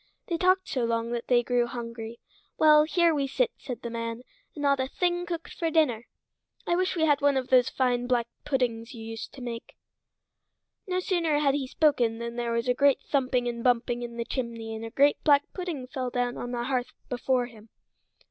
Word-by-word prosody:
They 340 - 0
talked 370 +1 +3
so 255 - -1
long 230 0 -1
that 240 -1 -3
they 240 -1 +4
grew 245 0 +1
hungry. 230 -1 -7 0.4
"Well, 305 -1 +6
here 335 +1 +3
we 280 -2 0
sit," 480 - +1
said 250 -3 -7
the 235 - -4
man, 230 +1 -4 0.3
"and 295 - -5
not 280 -1 +3
a 260 - 0
thing 350 +4 -1
cooked 335 -1 -5
for 330 - -1
dinner. 260 -8 +2 0.6
I 345 - +1
wish 370 +1 0
we 320 -2 +2
had 290 -2 +3
one 285 -1 +3
of 255 -1 -2
those 250 -2 +5
fine 245 -2 0
black 245 -2 +2 0.2
puddings 250 -4 -1
you 225 - -8
used 225 0 -6
to 270 - -10
make." 230 -1 -7 1.1
No 365 0 0
sooner 335 -5 +1
had 285 -2 +3
he 275 -2 -1
spoken 255 -6 +2
than 235 0 -5
there 240 -1 -2
was 235 +2 -1
a 250 - +4
great 280 +1 +3
thumping 255 -3 +1
and 235 -1 -3
bumping 245 -1 +2
in 235 -1 -6
the 235 - -2
chimney 230 -3 -4
and 220 - -6
a 225 - -5
great 280 +5 +3
black 290 -2 +5
pudding 345 -8 -4
fell 255 -1 -4
down 245 0 -1
on 245 - -5
the 240 -1 -2
hearth 255 -1 -2
before 250 0 0
him. 225 -2 -14
255 Hz, 210 wpm, -27 LUFS, 235-295 Hz, 1.1 s, Well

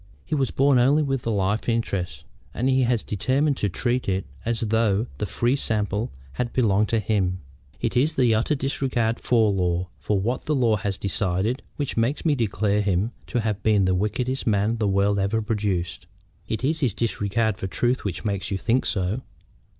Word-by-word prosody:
He - - -5
was 135 -4 +1
born 135 -1 +3
only 140 +5 +4
with 135 -3 -1
the 115 - -3
life 100 +2 0
interest, 100 -10 -2 0.3
and 125 - 0
he 130 0 +3
has 120 -2 +1
determined 135 +8 +1
to 105 - 0
treat 120 +5 -1
it 95 0 -1 0.2
as 115 -1 -1
though 110 -1 +2
the 105 - -1
fee 120 +6 +1
simple 105 -3 -1 0.2
had 120 - -2
belonged 105 -4 +2
to 115 - +2
him. 95 -4 0 0.4
It 115 +1 -2
is 150 +6 +2
his 125 -4 +4
utter 115 +7 +1
disregard 125 -4 -1
for 115 -4 +3
law, 90 -2 0
for 105 -2 0
what 120 +6 -2
the 150 - +1
law 115 -5 +3
has 100 -2 -2
decided, 100 +5 0
which 145 -5 -3
makes 120 +9 0
me 155 - +4
declare 105 -4 +1
him 100 +2 0 0.2
to 120 - -1
have 105 -2 -2
been 105 -2 +3
the 95 - +2
wickedest 120 +8 -1
man 105 +2 +2
the 110 -2 0
world 100 +1 +2
ever 100 +3 +1
produced." 100 -6 -2 0.4
"It 110 - -3
is 155 +4 +1
his 130 -10 0
disregard 110 -2 0
for 95 - -3
truth 120 +7 0
which 100 +1 -4
makes 100 -1 -2
you 100 - -1
think 120 +6 +1
so." 95 +6 -1
110 Hz, 190 wpm, -24 LUFS, 100-125 Hz, 0.4 s, only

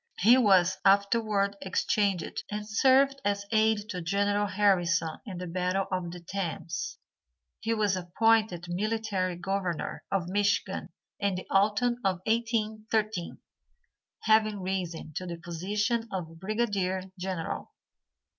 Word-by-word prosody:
He 225 +6 +6
was 190 -7 +4
afterward 200 0 +3
exchanged 190 -1 0
and 210 0 -4
served 270 +5 +4
as 200 0 0
aid 220 -1 +2
to 180 -3 -4
General 200 +4 +1
Harrison 175 -5 +2
in 190 -3 -6
the 180 - -5
battle 180 +2 -1
of 185 -2 -2
the 175 +1 -8
Thames. 185 - -4 0.6
He 230 0 -1
was 210 -3 +2
appointed 185 0 +2
military 195 -1 -1
governor 180 -1 -3
of 190 -3 0
Michigan 200 +2 0 0.3
in 200 -2 0
the 185 - -5
autumn 210 +5 +3
of 185 -2 0
1813, 220 -4 -1 0.8
having 215 -1 +3
risen 180 -4 -3
to 185 - -4
the 170 -1 -5
position 205 +8 -1
of 165 -3 -5
Brigadier 195 -2 -1 0.2
General. 180 -3 -4
200 Hz, 120 wpm, -29 LUFS, 180-215 Hz, 0.8 s, He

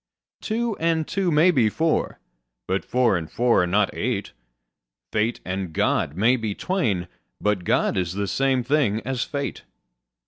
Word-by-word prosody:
Two 230 0 -1
and 165 -1 +1
two 195 -2 0
may 165 +3 +5
be 125 -9 +3
four: 160 +8 0 0.5
but 95 +1 0
four 125 -5 +2
and 80 -3 -3
four 120 -4 +3
are 90 - +1
not 100 +3 +2
eight: 115 -4 -2 0.8
Fate 110 +2 0
and 95 -2 -4
God 75 -1 0
may 115 +7 +3
be 110 -4 -3
twain: 115 - -1 0.3
but 105 -3 0
God - - +1
is 90 -2 -1
the 100 +1 -2
same 135 +3 +1
thing 125 -5 +1
as 130 -2 -1
fate. 140 -1 -4
120 Hz, 160 wpm, -24 LUFS, 100-150 Hz, 0.8 s, may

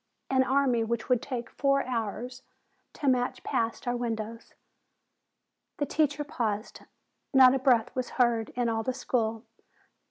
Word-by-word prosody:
An 260 -1 +4
army 260 -3 +2
which 230 +1 -3
would 250 -2 +3
take 245 -2 -4
four 275 0 +1
hours 245 +1 -4 0.5
to 290 - -4
march 250 -1 +1
past 230 +1 -2
our 245 - +1
windows." 230 -1 -4 1.2
The 290 - 0
teacher 295 -1 0
paused. 225 -7 -3 0.6
Not 260 -1 +8
a 270 - +1
breath 245 -4 +3
was 255 -1 -2
heard 235 -3 +2
in 245 -1 0
all 225 -1 0
the 255 +3 -2
school. 225 -3 -1
245 Hz, 145 wpm, -28 LUFS, 230-260 Hz, 1.2 s, Not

